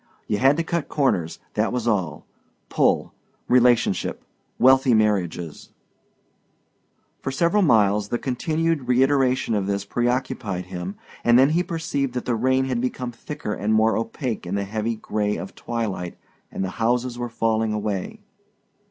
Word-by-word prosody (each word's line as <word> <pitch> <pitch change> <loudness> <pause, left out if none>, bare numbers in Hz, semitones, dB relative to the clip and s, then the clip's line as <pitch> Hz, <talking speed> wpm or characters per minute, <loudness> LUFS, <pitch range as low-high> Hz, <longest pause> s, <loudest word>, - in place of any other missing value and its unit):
You 105 - -1
had 135 +3 +4
to 170 - +1
cut 165 -3 -2
corners, 95 - 0 0.2
that - - 0
was 125 -2 -2
all. 90 -9 -1 0.4
Pull - - +1 0.3
relationship 125 -1 +2 0.3
wealthy 130 -1 +5
marriages 90 -7 -1 1.5
For - - -4
several 170 +9 +2
miles 105 - +3
the 120 - 0
continued 155 +3 -1
reiteration 130 -1 +2
of 100 -2 0
this 100 0 -1
preoccupied 120 -5 -1
him 90 +1 -6 0.3
and 120 0 +5
then 135 +3 +5
he 170 +3 +2
perceived 160 -7 -2
that 125 - -3
the 125 - 0
rain 130 +3 +2
had 125 -3 -1
become 125 -1 -3
thicker 120 -2 -6
and 105 +2 0
more 110 +1 +3
opaque 115 - -3
in 95 - -2
the 100 - 0
heavy 110 +3 -2
gray 105 -1 -2
of 95 - -7
twilight 105 -7 -4 0.3
and - - -3
that - - -1
the - - -11
houses 120 +1 0
were 120 0 -3
falling 115 -1 0
away. 105 -3 -3
120 Hz, 150 wpm, -23 LUFS, 105-130 Hz, 1.5 s, wealthy